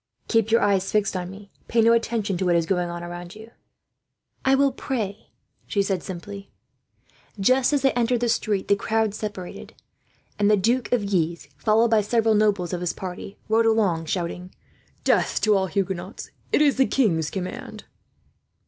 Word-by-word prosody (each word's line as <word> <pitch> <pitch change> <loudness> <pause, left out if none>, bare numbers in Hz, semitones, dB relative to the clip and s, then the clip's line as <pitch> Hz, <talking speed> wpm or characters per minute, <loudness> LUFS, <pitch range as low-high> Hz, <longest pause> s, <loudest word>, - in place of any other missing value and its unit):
"Keep 225 -2 +2
your 230 +1 +4
eyes 195 -2 +1
fixed 210 -2 +1
on 180 -1 -3
me. 200 +1 -12 0.2
Pay 230 - +2
no 230 +1 +5
attention 230 -4 0
to 185 +1 -2
what 175 - +3
is 170 -1 +2
going 180 -1 0
on 170 0 -6
around 175 0 -8
you." 220 +2 -12 0.9
"I 265 0 +4
will 275 0 +3
pray," 220 -6 -4 0.4
she 200 - +1
said 195 -3 -1
simply. 200 +2 -8 0.9
Just 255 +7 +3
as 285 -2 +1
they 270 - +4
entered 240 0 +1
the 240 - +1
street 210 -4 0
the 200 - +4
crowd 220 +1 0
separated, 205 -4 -7 0.6
and 205 0 +3
the 210 - +5
Duke 235 +6 0
of 210 -5 0
Guise, 170 -4 -1
followed 215 +11 +2
by 220 -1 +5
several 225 +1 +2
nobles 205 -4 +1
of 175 - -3
his 180 - -1
party, 185 +1 -7
rode 225 +1 +3
along, 195 -8 +2
shouting: 180 +1 -3 0.5
"Death - - +2
to 215 -1 +4
all 190 -1 +1
Huguenots! 190 +1 -4 0.2
It 300 - +4
is 285 -3 +3
the 265 - +4
king's 165 - +1
command." 185 -2 -6
205 Hz, 175 wpm, -24 LUFS, 180-225 Hz, 0.9 s, no